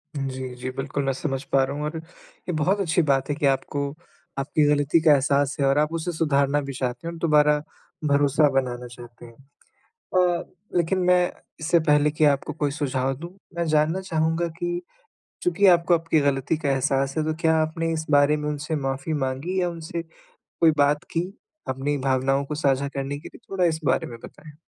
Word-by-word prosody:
जी, 130 Hz, -2 st, -3 dB
जी, 125 Hz, +1 st, -5 dB
बिल्कुल, 135 Hz, +1 st, -3 dB
मैं 135 Hz, 0 st, 0 dB
समझ 135 Hz, 0 st, -3 dB
पा 135 Hz, -1 st, +2 dB
रहा 140 Hz, +2 st, -3 dB
हूँ 150 Hz, -, -3 dB
और 160 Hz, +2 st, -4 dB
ये 165 Hz, +2 st, -11 dB
बहुत 185 Hz, +7 st, +1 dB
अच्छी 175 Hz, -1 st, +2 dB
बात 135 Hz, -2 st, +1 dB
है 145 Hz, -, 0 dB
कि 150 Hz, -2 st, -1 dB
आपको 140 Hz, +1 st, 0 dB, 0.5 s
आपकी 150 Hz, +2 st, +1 dB
ग़लती 145 Hz, +2 st, +3 dB
का 155 Hz, -2 st, +5 dB
एहसास 140 Hz, 0 st, +2 dB
है, 140 Hz, -, +2 dB
और 135 Hz, +1 st, +3 dB
आप 150 Hz, +2 st, +1 dB
उसे 165 Hz, +2 st, -2 dB
सुधारना 145 Hz, -3 st, +1 dB
भी 140 Hz, -1 st, -6 dB
चाहते 125 Hz, +5 st, -3 dB
हैं, -, -, -3 dB
और -, -, -9 dB
दोबारा 150 Hz, -2 st, +4 dB, 0.5 s
भरोसा 145 Hz, +1 st, +3 dB
बनाना 125 Hz, -2 st, -1 dB
चाहते 120 Hz, 0 st, -13 dB
हैं। 115 Hz, -1 st, -14 dB, 0.6 s
अ, 180 Hz, -, 0 dB, 0.3 s
लेकिन 175 Hz, +3 st, +1 dB
मैं, 180 Hz, 0 st, +3 dB, 0.3 s
इससे 170 Hz, +2 st, +3 dB
पहले 150 Hz, -1 st, +3 dB
कि 155 Hz, 0 st, +2 dB
आपको 145 Hz, +1 st, +1 dB
कोई 145 Hz, -2 st, -1 dB
सुझाव 135 Hz, -3 st, -1 dB
दूँ, 170 Hz, +3 st, -8 dB, 0.2 s
मैं 170 Hz, 0 st, -1 dB
जानना 155 Hz, +4 st, +2 dB
चाहूँगा 165 Hz, -1 st, 0 dB
कि 175 Hz, 0 st, -2 dB, 0.6 s
चूँकि 280 Hz, -, +3 dB
आपको 175 Hz, -1 st, +5 dB
आपकी 165 Hz, -2 st, +1 dB
ग़लती 140 Hz, +2 st, +1 dB
का 145 Hz, -3 st, -2 dB
एहसास 135 Hz, +1 st, 0 dB
है, 155 Hz, -, +1 dB
तो 155 Hz, 0 st, -1 dB
क्या 160 Hz, 0 st, +3 dB
आपने 165 Hz, +1 st, -2 dB
इस 160 Hz, 0 st, -3 dB
बारे 145 Hz, +1 st, +5 dB
में 150 Hz, 0 st, -3 dB
उनसे 150 Hz, +2 st, -3 dB
माफ़ी 135 Hz, +2 st, -3 dB
माँगी 145 Hz, +6 st, -1 dB
या 180 Hz, -, +1 dB
उनसे 165 Hz, 0 st, -5 dB, 0.4 s
कोई 165 Hz, -1 st, +2 dB
बात 145 Hz, +3 st, +3 dB
की? 175 Hz, +3 st, -2 dB, 0.4 s
अपनी 135 Hz, +2 st, -1 dB
भावनाओं 135 Hz, +1 st, +1 dB
को 145 Hz, +2 st, -5 dB
साझा 140 Hz, -2 st, +1 dB
करने 140 Hz, +1 st, -4 dB
के -, -, -10 dB
लिए? -, -, -15 dB
थोड़ा 190 Hz, -2 st, +1 dB
इस 160 Hz, -1 st, +1 dB
बारे -, -, +1 dB
में 115 Hz, -, -9 dB
बताएँ? 150 Hz, -1 st, -13 dB
150 Hz, 195 wpm, -24 LUFS, 135-165 Hz, 0.6 s, का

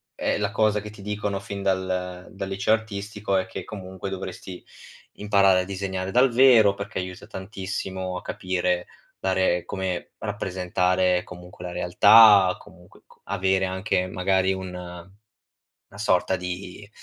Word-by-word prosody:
ehm, -, -, -1 dB
la 100 Hz, -, 0 dB
cosa 105 Hz, 0 st, +2 dB
che 105 Hz, 0 st, -9 dB
ti 105 Hz, -, -13 dB
dicono 105 Hz, -1 st, -3 dB
fin 100 Hz, 0 st, -7 dB
dal 95 Hz, -1 st, -2 dB
dal 95 Hz, 0 st, -6 dB
liceo 100 Hz, +3 st, +1 dB
artistico 105 Hz, -2 st, -2 dB
è 95 Hz, -, 0 dB
che 95 Hz, -, -7 dB
comunque 95 Hz, -2 st, -7 dB
dovresti 95 Hz, -1 st, -7 dB, 0.6 s
imparare 100 Hz, -2 st, +4 dB
a -, -, -3 dB
disegnare 95 Hz, -1 st, -4 dB
dal 125 Hz, +1 st, +4 dB
vero, 115 Hz, -5 st, +6 dB
perché 100 Hz, -1 st, -5 dB
aiuta 90 Hz, 0 st, -7 dB
tantissimo 95 Hz, -1 st, -5 dB
a -, -, -7 dB
capire, 90 Hz, -1 st, -2 dB, 0.3 s
dare 95 Hz, -2 st, +1 dB
come 95 Hz, -2 st, -4 dB
rappresentare 90 Hz, -2 st, 0 dB
comunque 90 Hz, 0 st, -11 dB
la 90 Hz, -, -5 dB
realtà, 100 Hz, +1 st, +6 dB
comunque 90 Hz, 0 st, -18 dB
co -, -, -23 dB
avere 95 Hz, -1 st, +1 dB
anche 95 Hz, 0 st, -1 dB
magari 95 Hz, +1 st, +1 dB
una 90 Hz, -1 st, -8 dB, 0.8 s
na 100 Hz, -, -15 dB
sorta 95 Hz, -3 st, +1 dB
di 90 Hz, +2 st, -7 dB
95 Hz, 140 wpm, -24 LUFS, 90-100 Hz, 0.8 s, vero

